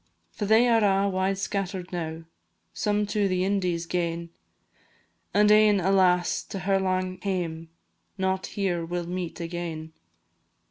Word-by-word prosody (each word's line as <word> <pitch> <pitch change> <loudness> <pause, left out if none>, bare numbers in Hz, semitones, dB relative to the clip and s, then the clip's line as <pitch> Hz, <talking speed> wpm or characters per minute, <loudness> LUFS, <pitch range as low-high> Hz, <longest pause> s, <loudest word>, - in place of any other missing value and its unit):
For 205 - -4
they 225 +3 +5
are 230 -2 +4
a' 195 0 +3
wide 190 0 0
scatter'd 190 -2 -3
now, 165 -2 -4 0.5
Some 210 0 0
to 205 0 0
the 185 -1 0
Indies 180 -4 0
gane, 170 -1 -2 1.0
And 210 +1 +4
ane, 210 -1 +6
alas! 180 -1 +3
to 195 - -6
her 195 +1 +2
lang 185 -1 -1
hame; 170 -4 -3 0.5
Not 190 0 -1
here 185 -4 -1
we 175 +2 -3
'll 175 - -3
meet 180 -1 -4
again. 165 -2 -5
185 Hz, 140 wpm, -26 LUFS, 175-200 Hz, 1.0 s, ane